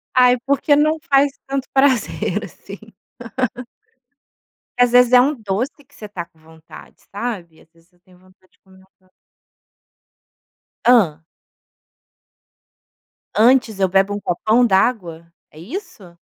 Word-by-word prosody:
Ai 250 0 +5
porque 280 +1 +2
não 305 +2 +2
faz 275 0 +4 0.2
tanto 270 -1 -3
prazer 270 -3 +1
assim. - - -12 2.0
Às 245 -1 +4
vezes 245 0 +5
é 250 - +7
um 275 +4 +2
doce 225 +1 -3
que 280 - -36
você 215 - -10
está 190 -4 -7
com 170 -1 -35
vontade, 160 0 -16
sabe, 200 -7 -6
Às 160 - -25
vezes 165 +2 -28
eu 175 - -34
tenho 180 0 -24
vontade 185 0 -27
de - - -36
comer 190 -1 -23
um - - -20 0.3
doce. - - -36 1.7
Hã. 180 -11 +3 2.1
Antes, 230 -2 +3
eu 190 - +2
bebo 195 +2 +1
um 205 - -4
copão 215 +7 +1
d'água, 185 -6 -1 0.2
é 155 - -15
isso? 220 - -10
210 Hz, 130 wpm, -19 LUFS, 180-255 Hz, 2.1 s, é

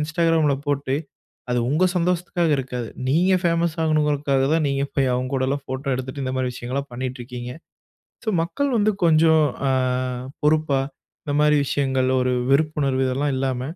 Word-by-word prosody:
Instagram 165 +1 +1
ல - - +2
போட்டு 140 -2 0 0.6
அது 125 - +1
உங்க 155 +6 +3
சந்தோஷத்துக்காக 175 -1 +1
இருக்காது. 125 -3 -4 0.2
நீங்க 180 +7 +3
ஃபேமஸ் 170 -2 +1
ஆகணுங்கிறதுக்காக 150 -3 +1
தான் 160 -1 +2
நீங்க 140 0 0
போய் 135 -2 +2
அவுங்க 130 +1 -2
கூடலாம் 135 +2 0
ஃபோட்டோ 130 +2 -5
எடுத்துட்டு, 130 +2 -5
இந்த 130 - -2
மாரி 130 -1 0
விஷயங்கள்லாம் 130 +3 -4
பண்ணீட்ருக்கீங்க. 125 -1 -5 0.7
ஸோ 220 - 0
மக்கள் 175 +13 -1
வந்து 215 -1 +3
கொஞ்சம் 160 -1 +5 0.3
அ - - +2 0.7
பொறுப்பா, 150 -2 +2 0.4
இந்த 145 - -3
மாரி 150 0 +4
விஷயங்கள், 130 -2 0
ஒரு 125 0 +1 0.2
வெறுப்புணர்வு 140 -2 +1
இதெல்லாம் 140 +3 0
இல்லாம, 130 -2 -1
140 Hz, 150 wpm, -22 LUFS, 130-160 Hz, 0.7 s, கொஞ்சம்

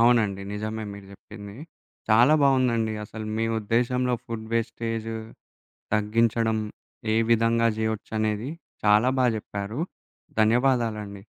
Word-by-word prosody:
అవునండి. 110 -5 +3
నిజమే 110 +1 -4
మీరు 100 -1 -10
జెప్పింది. 100 +1 -11 0.5
చాలా 120 +8 +6
బావుందండి. 125 -5 +3
అసలు 110 0 -7
మీ 115 - +1
ఉద్దేశంలో 125 +3 +1
ఫుడ్డు 110 -1 -6
వేస్టేజు 115 -1 -2 0.8
తగ్గించడం 110 +1 +2 0.6
ఏ - - +2
విధంగా 115 0 +3
జేయొచ్చనేది 110 +1 -1 0.4
చాలా 105 +4 +5
బా 125 - +5
జెప్పారు. 105 +5 -5 0.6
ధన్యవాదాలండి. 110 -4 +1
110 Hz, 100 wpm, -26 LUFS, 105-115 Hz, 0.8 s, చాలా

